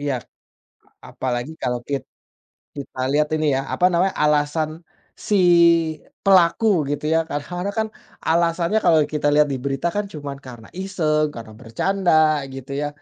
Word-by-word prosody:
iya. 145 -2 -1 0.9
Apalagi 125 +3 -3
kalo 125 -1 0
kit 140 -3 -2 0.7
kita 140 -2 -8
lihat 150 +1 +2
ini 155 0 -1
ya, 135 - 0
apa 180 - +2
namanya 185 +3 +1
alasan 150 +1 +1 0.6
si 210 - +3 0.9
pelaku 190 +3 +4 0.2
gitu 145 +1 -3
ya? 165 - +4
Kadang-kadang 175 +7 -4
kan 220 - 0 0.4
alasannya 170 +4 +2
kalo 165 - +5 0.2
kita 150 -1 0
lihat 150 0 +5
di - - -2
berita 140 +3 -1
kan 205 0 0
cuman 145 -2 -6
karena 120 -3 -11
iseng, 155 -6 0
karena 110 -2 -9
bercanda, 180 - 0 0.4
gitu 135 0 -9
ya? 145 - -1
150 Hz, 145 wpm, -21 LUFS, 140-175 Hz, 0.9 s, kalo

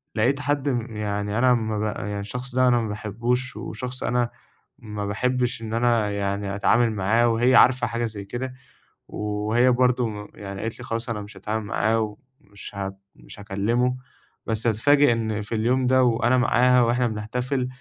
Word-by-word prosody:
لقيت 125 +6 +2
حد 145 0 0
م 120 -3 -3
يعني، 105 0 -2
أنا 130 +1 +4
أما 110 -3 0
بقى 105 0 -2
يعني، 100 - -3
الشخص 125 +5 -6
ده، 130 0 +4
أنا 120 -1 +4
ما 110 - -2
بحبُّوش، 120 +5 -2
وشخص 125 0 -5
أنا 120 -1 +1 0.5
ما 105 -2 -5
بحبِّش 125 +3 -1
إن 110 -1 -5
أنا 115 -3 +2
يعني 100 0 -2
أتعامل 115 +3 +3
معاه، 110 +4 +2
وهي 120 +3 +3
عارفة 125 -1 +5
حاجة 115 +1 -2
زيّ 105 -3 -6
كده، 125 +5 -5 0.5
وهي 105 +4 +1
برضه 125 -1 +2
م 105 -1 -7
يعني، 100 -1 -7
قالت 115 +1 -4
لي: - - -8
"خلاص، 115 +1 -3
أنا 105 -2 -3
مش 100 +1 -11
هتعامل 110 0 -3
معاه 110 0 0 0.3
ومش 100 -1 -11
هب 95 -1 -4 0.2
مش - - -14
هكلِّمه." 115 +5 0 0.5
بس 110 +1 0
أتفاجأ 140 +5 +4
إن 110 -2 -2
في 105 +2 -4
اليوم 125 +4 +1
ده، 130 0 +4
وأنا 120 +1 +3
معاها، 125 +1 +4
وإحنا 120 +1 +2
بنحتفل 125 +4 -2
115 Hz, 175 wpm, -24 LUFS, 105-125 Hz, 0.5 s, عارفة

